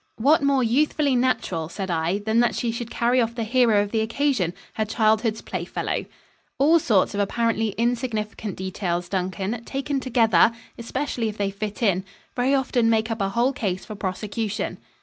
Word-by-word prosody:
"What 285 +8 +4
more 275 -2 +3
youthfully 280 +3 +2
natural," 190 -10 0
said 190 0 -4
I, 165 +3 0
"than 220 +2 0
that 240 - +2
she 235 - -1
should 235 0 -5
carry 245 -1 +2
off 230 0 -1
the 235 - -2
hero 225 -3 +3
of 205 - -6
the 225 - +1
occasion 225 - 0 0.2
her 220 - 0
childhood's 220 0 +1
playfellow?" - - -3 0.5
"All 315 +5 +5
sorts 215 -10 +2
of 205 - -2
apparently 225 +1 0
insignificant 225 -4 -2
details, 180 -2 -3
Duncan, 190 +4 -2
taken 275 +2 -2
together 235 -3 +4 0.2
especially 240 -1 -2
if 215 - -8
they 200 -1 -1
fit 210 +3 -5
in 190 -3 +2 0.3
very 255 +3 +2
often 245 -3 +2
make 220 0 +1
up 225 -2 -2
a 195 - +1
whole 240 +6 +1
case 190 -7 -3
for 215 - -7
prosecution." 210 +2 -3
225 Hz, 170 wpm, -24 LUFS, 205-245 Hz, 0.5 s, All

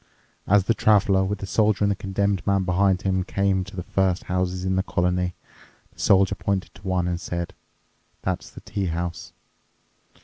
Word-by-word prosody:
As 100 0 +5
the 115 - +2
Traveler, 100 -3 +3
with 100 +2 -1
the 100 - -6
Soldier 105 +1 +2
and 100 - +3
the - - 0
Condemned 100 0 -1
Man 100 -1 +3
behind 95 +1 +2
him, 95 -1 +1
came 95 0 0
to 95 +2 -11
the 90 - -4
first 95 0 0
houses 90 0 -2
in 95 0 +1
the 95 - +2
colony, 90 -1 0 0.6
the - - -22
Soldier 95 0 +4
pointed 100 -1 -2
to - - -16
one 90 -2 +1
and 90 -1 -2
said, 85 +1 -4 0.7
"That's - - -2
the - - -12
tea 100 -2 -3
house." 85 0 -4
95 Hz, 180 wpm, -24 LUFS, 90-100 Hz, 0.7 s, As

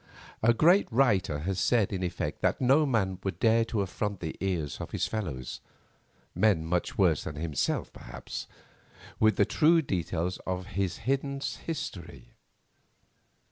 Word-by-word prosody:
A 115 - +5
great 170 - +4
writer 105 - +2
has 95 +3 -2
said 110 -1 +2
in 95 - -2
effect 90 -1 -3
that - - +1
no 135 +4 +4
man 95 -7 0
would 95 - -3
dare 115 0 +4
to 110 -2 -1
affront 100 +1 -3
the 80 -2 -5
ears 85 -6 -2
of - - -6
his - - -1
fellows—men 90 - -3
much 85 +1 -1
worse 85 -6 +3
than 75 - -6
himself 75 -2 -2
perhaps—with 110 0 -4
the - - +4
true 165 +1 +4
details 90 - -2
of 95 0 -4
his 95 -2 -1
hidden 140 +1 0
history. 90 - -6
95 Hz, 140 wpm, -29 LUFS, 85-120 Hz, -, A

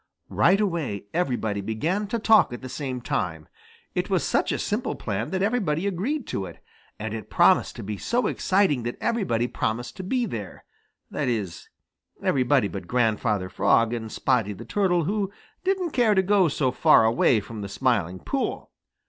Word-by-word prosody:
Right 190 +4 +3
away 165 - -2
everybody 120 - -1
began 155 - -1
to 235 - -1
talk 220 - +5
at 120 +1 -7
the - - -5
same 130 -2 -4
time. 90 - -3 0.5
It - - -2
was - - +1
such - - +1
a - - 0
simple - - -2
plan - - -3
that 185 +2 -1
everybody 200 -7 0
agreed 220 - -2
to 95 -1 -3
it. 85 - -11 0.4
And 105 0 -5
it 110 -3 -6
promised - - +4
to - - -7
be 105 +1 -4
so 240 - 0
exciting 190 -10 +2
that 120 +1 -4
everybody 185 - 0
promised 120 0 -3
to 190 - -5
be 245 +6 0
there, 105 - -7 0.5
that - - -2
is, 105 -9 -3 0.5
everybody 130 -3 +2
but 95 -3 -7
Grandfather 110 -4 +1
Frog 115 +4 +2
and 110 -2 -4
Spotty 115 -6 +1
the 95 - -10
Turtle, 180 -4 +1
who 200 +3 -1 0.3
didn't 370 -3 0
care 235 -6 +3
to 190 - +4
go 195 -1 +4
so 135 -3 0
far 115 - +5
away 115 +1 +3
from 105 +1 -8
the 100 - -5
Smiling 100 -6 0
Pool. - - -3
130 Hz, 175 wpm, -25 LUFS, -, 0.5 s, talk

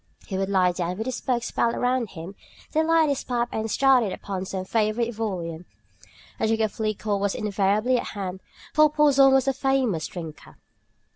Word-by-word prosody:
He 195 - -5
would 195 0 -1
lie 185 -2 +3
down 175 0 -3
with 220 - -3
his 255 -1 -4
books 240 -2 -1
piled 230 - +1
around 250 -1 0
him, 175 +1 -8 0.4
then 315 +1 +1
light 325 -1 +4
his 280 -2 -1
pipe 240 -1 -1
and 220 0 -3
start 270 +1 +4
in 200 - -2
upon 190 -1 -5
some 185 0 -4
favorite 225 +3 0
volume. 180 -6 -4 0.7
A - - +1
jug 225 0 +1
of 220 0 -2
liquor 215 -1 -1
was 200 0 -1
invariably 210 +4 +1
at - - -5
hand, 190 -1 -4 0.3
for 305 0 +5
Porson 285 -3 +5
was 265 0 +3
a 270 - +3
famous 260 - 0
drinker. 165 -4 -9
220 Hz, 190 wpm, -25 LUFS, 190-255 Hz, 0.7 s, for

